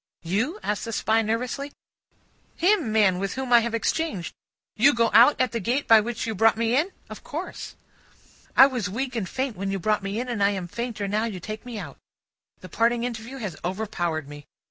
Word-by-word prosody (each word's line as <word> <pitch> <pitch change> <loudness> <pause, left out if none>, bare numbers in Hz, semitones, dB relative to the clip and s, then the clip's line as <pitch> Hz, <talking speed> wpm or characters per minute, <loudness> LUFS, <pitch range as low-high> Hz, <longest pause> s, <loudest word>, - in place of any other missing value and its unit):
"You?" 225 - -1
said 210 - 0
the 230 +3 -6
Spy 220 +1 +2
nervously. 250 +6 -3 0.8
"Him, 350 - +2
man, 205 -4 +3
with 195 0 -3
whom 260 -2 -2
I 240 - +9
have 230 0 -2
exchanged. 230 - -2 0.4
You 275 +5 +5
go 230 -1 +2
out 245 +6 +7
at 255 - +2
the 235 - -2
gate 245 +7 -1
by 225 -2 +7
which 230 +1 -4
you 225 - -2
brought 225 +2 +3
me 230 +1 +1
in?" 320 +8 +1 0.2
"Of - - -10
course." - - -6 0.8
"I 265 - +10
was 245 -8 -2
weak 250 +5 -3
and 200 -6 -2
faint 260 -3 -2
when 195 +1 -3
you 195 - -1
brought 210 +3 0
me 195 +3 -3
in, 250 - -3
and 235 -4 -3
I 200 - +5
am 190 -3 -3
fainter 220 +1 -4
now 210 +3 0
you 210 -5 -5
take 215 +6 -7
me 240 -3 -6
out. 160 -9 -8 0.6
The 185 - -9
parting 230 +5 +1
interview 240 +2 -5
has 205 -10 -5
overpowered 175 -5 -2
me. 145 0 -11
225 Hz, 210 wpm, -25 LUFS, 200-245 Hz, 0.8 s, I